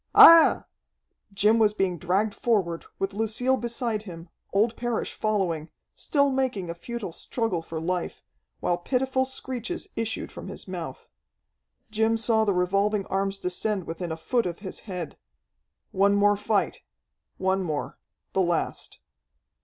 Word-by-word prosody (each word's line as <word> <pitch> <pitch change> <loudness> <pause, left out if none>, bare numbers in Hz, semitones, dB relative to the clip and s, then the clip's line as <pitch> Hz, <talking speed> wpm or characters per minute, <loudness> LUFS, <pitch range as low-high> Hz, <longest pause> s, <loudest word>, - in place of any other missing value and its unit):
Aiah!" 330 -1 +9 0.7
Jim 210 +3 +3
was 210 -1 +3
being 185 -4 0
dragged 195 +5 +1
forward, 190 -9 0
with 195 0 -2
Lucille 225 +5 +1
beside 235 -3 -2
him, 170 -4 -10 0.2
old 220 +4 +2
Parrish 240 -2 -2
following, 185 -7 -1 0.2
still 280 -2 +1
making 250 -10 -1
a - - -4
futile 205 +1 -6
struggle 225 -3 -2
for 165 0 -6
life, 175 +2 -3 0.4
while 175 0 0
pitiful 260 +6 0
screeches 260 - -4
issued 225 -1 -3
from - - -9
his - - -7
mouth. 170 -8 -6 0.8
Jim 220 +1 +2
saw 220 0 +3
the 200 - +2
revolving 195 +3 +1
arms 195 0 0
descend 190 +2 -2
within 170 +1 -5
a 160 - -3
foot 235 +5 0
of 170 -1 -4
his 190 - -6
head. 180 -4 -5 0.7
One 200 +1 +3
more 205 0 +4
fight 205 0 0 0.6
one 190 0 +1
more, 155 -5 -3 0.3
the 190 - +2
last. 175 -2 -1
200 Hz, 140 wpm, -26 LUFS, 180-230 Hz, 0.8 s, Aiah